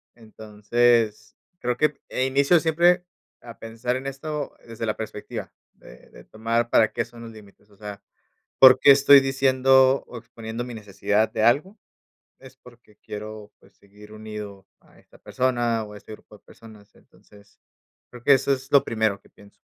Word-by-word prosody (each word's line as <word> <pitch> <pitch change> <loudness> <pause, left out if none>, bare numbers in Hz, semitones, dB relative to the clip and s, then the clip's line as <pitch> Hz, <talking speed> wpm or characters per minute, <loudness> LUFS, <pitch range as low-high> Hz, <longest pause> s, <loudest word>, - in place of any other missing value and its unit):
Entonces, 110 0 -1 0.2
creo 125 0 -2
que 150 +1 0
en 130 - -1
inicio 140 +6 +3
siempre 175 +3 +2 0.4
a 115 -1 -13
pensar 115 +2 -4
en 130 +1 -6
esto 145 +2 -6
desde 115 0 -6
la 110 - -3
perspectiva 110 -1 -8 0.2
de - - -18
de - - -16
tomar 115 +2 -2
para 110 -2 +3
qué - - -1
son 115 0 -15
los 115 - -10
límites, 105 -1 -18
o 100 - -23
sea, 105 0 -9 0.6
por 130 -1 +9
qué 140 - +7
estoy 140 0 +7
diciendo 130 0 +3
o 120 - -10
exponiendo 115 0 -8
mi 125 - -9
necesidad 105 0 -1
de 110 - -2
algo, 150 - +1 0.6
es 130 -1 -16
porque 120 -4 -20
quiero, 105 0 -9
pues, - - -24
seguir 105 +1 -18
unido 105 -2 -9
a - - -25
esta - - -22
persona 120 -3 -1
o 105 - -11
a 105 - -10
este 105 - -15
grupo 105 0 -16
de - - -36
personas. 110 -3 -17
Entonces, 100 -1 -23 0.5
creo 120 -1 -13
que 140 - +6
eso 135 +1 +1
es 135 0 -7
lo 140 -1 +5
primero 110 -5 -1
que - - -25
pienso. 100 0 -21
115 Hz, 175 wpm, -23 LUFS, 105-130 Hz, 0.6 s, por